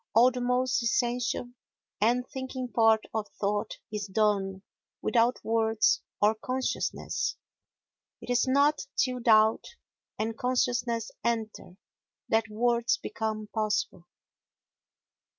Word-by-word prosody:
All 245 +3 +7
the 250 0 -4
most 250 +1 +1
essential 240 +1 0 0.5
and 245 +3 +2
thinking 260 -1 -5
part 225 -2 +4
of 220 -2 -2
thought 205 +1 -1 0.2
is 210 -1 -3
done 195 -1 0 0.4
without 235 +1 +2
words 220 -2 +2 0.2
or 210 +1 +4
consciousness. 255 +4 -2 0.8
It - - -6
is 245 +1 +2
not 280 +3 +2
till 255 -1 +1
doubt 220 -2 +4 0.5
and 220 +1 -2
consciousness 245 -2 0
enter 220 -5 -3 0.5
that 225 0 +2
words 235 +2 +1
become 215 -1 -4
possible. 210 -5 -1
230 Hz, 105 wpm, -28 LUFS, 215-245 Hz, 0.8 s, All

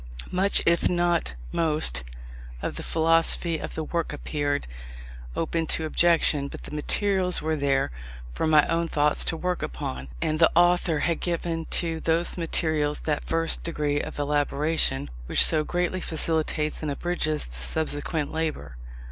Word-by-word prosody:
Much, 190 +2 +3
if 170 0 +3
not 175 - +1 0.2
most, 150 - +2 0.6
of - - -3
the - - -5
philosophy 165 0 +2
of - - -6
the 160 - -2
work 170 +2 -2
appeared 145 -1 -2 0.7
open 165 0 -1
to 160 - 0
objection; 155 -3 +3
but - - -9
the - - -8
materials 185 +4 +1
were 160 +1 -1
there, 140 - +1 0.4
for 160 - -1
my 155 -1 +5
own 165 0 0
thoughts 150 -1 +1
to 165 - 0
work 180 +1 -2
upon: 65 +1 -5
and 155 - -1
the 165 - +6
author 175 -2 +3
had 170 0 0
given 170 -1 -2
to 165 -1 -1
those 165 +2 +1
materials 155 -3 0
that 150 -2 -2
first 165 0 0
degree 150 -3 -1
of - - -7
elaboration, 145 - 0 0.2
which - - +5
so 155 -1 +2
greatly 180 +3 -1
facilitates 155 -2 -1
and 155 - -2
abridges 155 0 -1
the - - -13
subsequent 150 - -2
labour. 160 - -3
160 Hz, 150 wpm, -26 LUFS, 150-170 Hz, 0.7 s, the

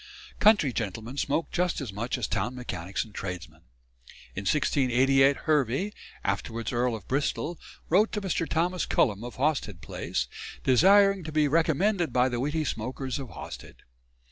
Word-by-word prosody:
Country 205 - +5
gentlemen 115 +3 -4
smoked 145 +4 -1
just 180 0 0
as 125 -9 -5
much 115 +6 -2
as 120 - -2
town 105 +7 -2
mechanics 95 -7 -4
and 110 - -16
tradesmen. 85 -6 -6 0.7
In 100 - -5
1688 135 0 +3
Hervey, 150 - +1 0.3
afterwards 110 +3 -2
Earl 120 0 +1
of 105 -5 -10
Bristol, 150 +4 -1 0.3
wrote 205 +6 +3
to 210 - -1
Mr. 175 -4 -1
Thomas 175 +1 0
Cullum, 105 -2 +2
of 120 - -7
Hawsted 130 - -1
Place, - - -3 0.4
desiring 195 - +5
"to 155 - -5
be 155 -1 +3
remembered 165 +4 +2
by 125 +1 +3
the 120 -1 -2
witty 150 +4 0
smoakers 130 +3 -3
of 135 -3 -6
Hawsted." 60 -8 -10
130 Hz, 150 wpm, -27 LUFS, 115-160 Hz, 0.7 s, Country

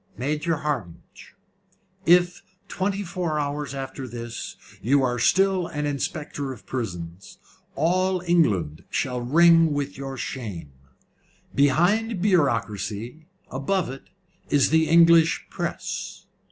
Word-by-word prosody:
"Major 150 +6 -1
Hardinge, 140 - -6 0.7
if, 175 +1 +4 0.3
twenty 200 +1 -2
four 175 -4 -2
hours 145 -1 -3
after 135 0 -6
this, 115 -1 -7 0.3
you 135 +5 +3
are 125 -1 0
still 190 - +3
an 150 0 -3
Inspector 145 -1 -3
of 125 - -11
Prisons, 90 -7 -6 0.4
all 185 +5 +1
England 105 - +1
shall 125 -2 -2
ring 165 +4 +5
with 145 -1 -3
your 135 -1 -5
shame. 100 - -6 0.8
Behind 180 - +2
bureaucracy 120 - 0 0.2
above 150 +4 -1
it 135 - -11 0.4
is 145 -2 +3
the 160 0 +3
English 165 0 +5
press." - - -5
145 Hz, 110 wpm, -24 LUFS, 125-170 Hz, 0.8 s, ring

